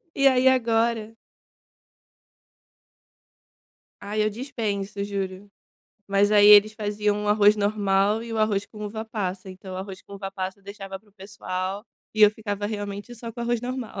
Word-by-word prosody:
E 275 0 +4
aí, 260 -1 +4
agora 230 -3 +1 2.9
Ai, 210 +1 -1
eu 215 - +1
dispenso, 210 -4 -4
juro. 195 -1 -5 0.6
Mas 200 +1 +2
aí 205 -1 +6
eles 210 +1 +8
faziam 210 -1 -1
o - - -1
arroz 210 0 +5
normal 205 0 +1
e 230 0 -7
o 225 - -2
arroz 210 -2 +1
com 210 -1 -9
uva-passa, 205 -3 -4
então 185 0 -9
o - - -5
arroz 190 0 -7
com 200 - -12
uva-passa, 195 -1 -5
deixava 195 -1 -8
para 210 +2 -29
o - - -27
pessoal, 195 0 -5 0.3
e 215 - -2
eu 210 - +9
ficava, 205 -1 -4
realmente, 205 +2 -5
só 230 0 -8
com 235 - -8
arroz 235 0 0
normal. 245 -4 -5
205 Hz, 155 wpm, -25 LUFS, 200-220 Hz, 2.9 s, eu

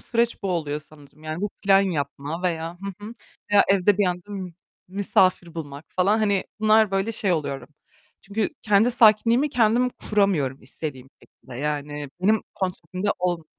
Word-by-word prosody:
süreç 235 -2 -1
bu 195 - -1
oluyor 150 -4 -2
sanırım. 150 -1 -19
Yani 155 +2 -5
bu 205 0 -2
plan 195 -1 +5
yapma 155 -2 -3
veya, 165 -1 -2
hı 200 +1 -7
hı, 220 - -7 0.4
veya 205 -1 +6
evde 195 +1 +3
bir 200 - +3
anda 180 +1 -4 0.4
misafir 185 -3 +1
bulmak 145 -2 -7
falan 195 +4 +2
hani 200 -3 +1 0.2
bunlar 215 -1 +4
böyle 195 +3 0
şey 200 -4 +1
oluyorum. 140 -5 -3 0.5
Çünkü 205 +1 -2
kendi 210 +3 +4
sakinliğimi 230 +4 +4
kendim 240 0 +3
kuramıyorum 190 - 0
istediğim 130 0 -7
şekilde 130 - -15
yani 145 0 -3
benim 215 +3 +3
kontrolümde 185 +1 -3
ol 175 -2 -1
185 Hz, 150 wpm, -24 LUFS, 155-205 Hz, 0.5 s, veya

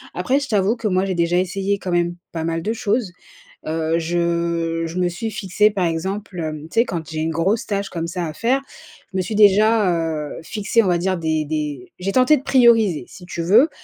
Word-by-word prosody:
Après 270 +2 +1
je 280 - -5
t'avoue 210 -2 +2
que 230 -2 -2
moi 185 -1 +1
j'ai 190 - -1
déjà 170 +1 +1
essayé 195 +2 0
quand 185 - -4
même 175 0 +1 0.2
pas 160 -1 -4
mal 165 0 -1
de 215 - -1
choses. 215 -2 -1 0.5
Heu, 160 +1 0
je 170 0 -1
je 165 +2 -6
me 180 - +2
suis 220 +6 -4
fixée 210 +2 +2
par 195 -3 0
exemple, 190 +4 -3
hem, 155 -2 -4
tu 225 - 0
sais - - +1
quand 165 -7 -5
j'ai 160 - -4
une 160 +1 -1
grosse 190 +8 0
tâche 200 -1 -2
comme 165 -2 -4
ça 175 +1 -3
à 155 - -6
faire, 255 - +1 0.5
je - - -2
me - - +2
suis 215 - -5
déjà, 210 0 +5 0.5
heu, - - -7
fixée 215 +4 +1
on 195 - -1
va 175 - +3
dire 185 +1 0
des 160 -2 0
des 150 -4 -4
j'ai 190 +2 -2
tenté 255 +6 +5
de 265 - -8
prioriser 225 - +4
si 180 - -13
tu 175 -1 -4
veux, 215 - +5
185 Hz, 225 wpm, -21 LUFS, 165-210 Hz, 0.5 s, déjà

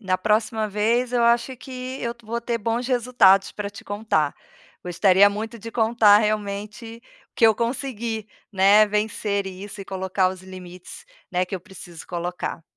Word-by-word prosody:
na 185 -3 -1
próxima 215 +1 0
vez 230 +5 0
eu 240 - +2
acho 235 +2 +2
que 255 +1 -7
eu 235 0 -2
vou 230 +2 -4
ter 235 0 -2
bons 230 +3 -2
resultados 240 -6 +3
pra 205 -1 -5
te 205 - -12
contar. 205 -8 -1 0.5
Gostaria 190 +3 +4
muito 220 +3 -6
de 230 +2 -8
contar 220 -3 +5
realmente 210 +2 -3 0.3
o - - -66
que 230 - +6
eu 220 - +5
consegui, 230 -2 -3 0.2
né, 200 +2 +6
vencer 210 -1 -1
isso 195 +2 -8
e - - -7
colocar 190 0 0
os 185 0 -8
limites, 185 -1 -11 0.2
né, 180 0 +1
que 185 - -6
eu 185 - -5
preciso 175 -3 -12
colocar. 175 -1 -4
210 Hz, 165 wpm, -23 LUFS, 190-230 Hz, 0.5 s, que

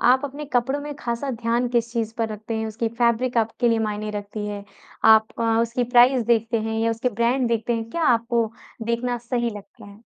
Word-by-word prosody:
आप 260 +3 +4
अपने 285 +2 -5
कपड़ों 265 +4 +1
में 295 0 -6
ख़ासा 240 +2 -3
ध्यान 235 +1 0
किस 235 -1 0
चीज़ 225 -2 -2
पर 225 -1 0
रखते 215 +1 -6
हैं? 220 0 -2
उसकी 225 +1 -2
फैब्रिक 240 +1 +1
आपके 230 +2 +1
लिए 230 -1 +2
मायने 210 0 -3
रखती 210 +1 -6
है? 205 -1 -5 0.4
आप 220 0 +7
अ, - - +1 0.2
उसकी 240 +2 -1
प्राइस 245 +1 +6
देखते 230 -1 +2
हैं 220 0 -2
या 230 0 +2
उसके 230 +3 -1
ब्रांड 235 +2 +1
देखते 230 +1 0
हैं? 225 0 -4
क्या 335 - -2
आपको 235 -3 +2 0.4
देखना 240 +1 -1
सही 240 -1 0
लगता 200 0 -13
है? 200 +1 -14
235 Hz, 210 wpm, -23 LUFS, 220-245 Hz, 0.4 s, आप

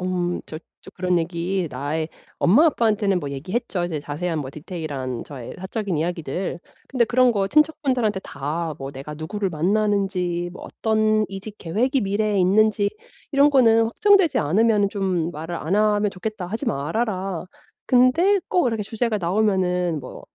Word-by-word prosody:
음, 180 -1 -1
저 155 - -7 0.3
저 - - -11
그런 180 -1 +1
얘기 170 +1 -1
나의 150 +4 -3 0.3
엄마 255 - +6
아빠한테는 210 - +2
뭐 140 -3 -5
얘기했죠. 185 - -3
이제 165 -4 -3
자세한 155 +3 -3
뭐 130 -2 -6
디테일한 145 -6 -5
저의 130 -5 -9
사적인 190 0 -3
이야기들. 170 +2 -3 0.3
근데 255 -3 +2
그런 250 +2 +4
거 200 -3 0
친척분들한테 265 -7 +2
다 155 +3 -3
뭐 135 0 -5
"내가 140 +2 -8
누구를 190 +6 -3
만나는지 185 0 0
뭐 - - -10
어떤 215 -1 +1
이직 195 +2 -8
계획이 245 +11 0
미래에 205 0 0
있는지 205 +2 +3 0.4
이런 280 +1 +5
거는 230 -5 +5
확정되지 380 - +3
않으면은 205 +6 +3
좀 185 -5 -1
말을 165 +2 -6
안 170 +3 -1
하면 210 -1 +2
좋겠다. 195 0 -5
하지 220 +9 -4
말아라." 190 +1 -2 0.4
근데 320 +11 +4
꼭 355 -7 +2
이렇게 225 -3 -1
주제가 220 +1 -1
나오면은 180 -3 +1
뭐 130 - -10
195 Hz, 340 characters per minute, -23 LUFS, 170-220 Hz, 0.4 s, 엄마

